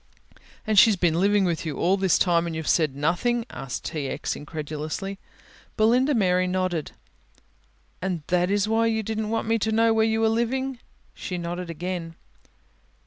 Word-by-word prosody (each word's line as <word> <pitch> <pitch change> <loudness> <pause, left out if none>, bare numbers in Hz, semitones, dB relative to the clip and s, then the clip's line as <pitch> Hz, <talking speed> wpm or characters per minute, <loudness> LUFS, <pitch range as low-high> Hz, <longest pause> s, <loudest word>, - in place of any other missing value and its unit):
"And 215 -2 +5
she's 220 -1 +6
been 175 -2 +1
living 200 +1 +3
with 170 -3 -1
you 155 -3 -4
all 185 +3 +2
this 190 -3 +2
time 170 -2 +2
and 165 - -4
you've 160 -1 -5
said 155 -6 +2
nothing!" 180 - 0
asked 135 -1 -6
T. 150 -4 -3
X., - - -3
incredulously. 155 +5 -5 0.6
Belinda 250 +6 +3
Mary 185 -4 +2
nodded. 180 -4 -2 1.1
"And 180 -4 -2
that 180 0 +2
is 205 0 +1
why 225 +1 +2
you 220 -1 0
didn't 220 0 -3
want 225 0 -1
me 225 0 +2
to 220 +1 0
know 225 +1 +3
where 220 0 +3
you 220 0 +1
were 225 - +3
living?" 250 +3 -1 0.3
She 180 - -5
nodded 175 +1 -5
again. 165 0 -5
185 Hz, 170 wpm, -25 LUFS, 170-220 Hz, 1.1 s, she's